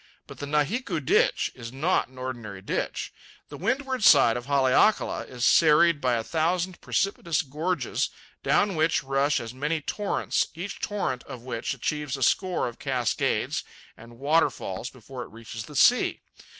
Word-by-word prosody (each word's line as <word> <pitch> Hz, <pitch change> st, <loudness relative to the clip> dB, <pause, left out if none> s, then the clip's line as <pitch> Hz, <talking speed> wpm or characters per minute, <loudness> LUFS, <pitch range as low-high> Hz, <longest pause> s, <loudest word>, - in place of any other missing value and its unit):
But -, -, -12 dB
the 145 Hz, -, -5 dB
Nahiku 160 Hz, -, 0 dB
Ditch 140 Hz, -, +2 dB
is 115 Hz, -2 st, -9 dB
not 155 Hz, +8 st, +1 dB
an 130 Hz, -, -20 dB
ordinary 120 Hz, -6 st, -6 dB
ditch. -, -, -3 dB, 0.4 s
The 145 Hz, -, -8 dB
windward 260 Hz, -, -1 dB
side 135 Hz, -9 st, +7 dB
of 120 Hz, +1 st, -5 dB
Haleakala 140 Hz, +9 st, +3 dB
is 125 Hz, -1 st, -3 dB
serried 160 Hz, -1 st, +5 dB
by 125 Hz, -2 st, +2 dB
a 115 Hz, -, -1 dB
thousand 175 Hz, +5 st, -1 dB
precipitous 170 Hz, -6 st, 0 dB
gorges, 160 Hz, +6 st, -2 dB, 0.3 s
down 200 Hz, -1 st, +2 dB
which 160 Hz, +1 st, +2 dB
rush 135 Hz, +1 st, +1 dB
as 115 Hz, -1 st, -7 dB
many 150 Hz, +5 st, -1 dB
torrents, 205 Hz, +7 st, -1 dB
each 185 Hz, +4 st, -6 dB
torrent 200 Hz, -11 st, -2 dB
of 130 Hz, -4 st, -9 dB
which 120 Hz, -2 st, -3 dB
achieves 150 Hz, -3 st, -3 dB
a 135 Hz, -, -2 dB
score 185 Hz, +6 st, +1 dB
of 120 Hz, -, -8 dB
cascades 125 Hz, -4 st, -1 dB, 0.3 s
and 115 Hz, +1 st, -14 dB
waterfalls 135 Hz, -, 0 dB
before 130 Hz, +1 st, -10 dB
it -, -, -8 dB
reaches 115 Hz, -1 st, -8 dB
the 150 Hz, -, -12 dB
sea. 245 Hz, -, +4 dB
145 Hz, 155 wpm, -26 LUFS, 125-170 Hz, 0.4 s, side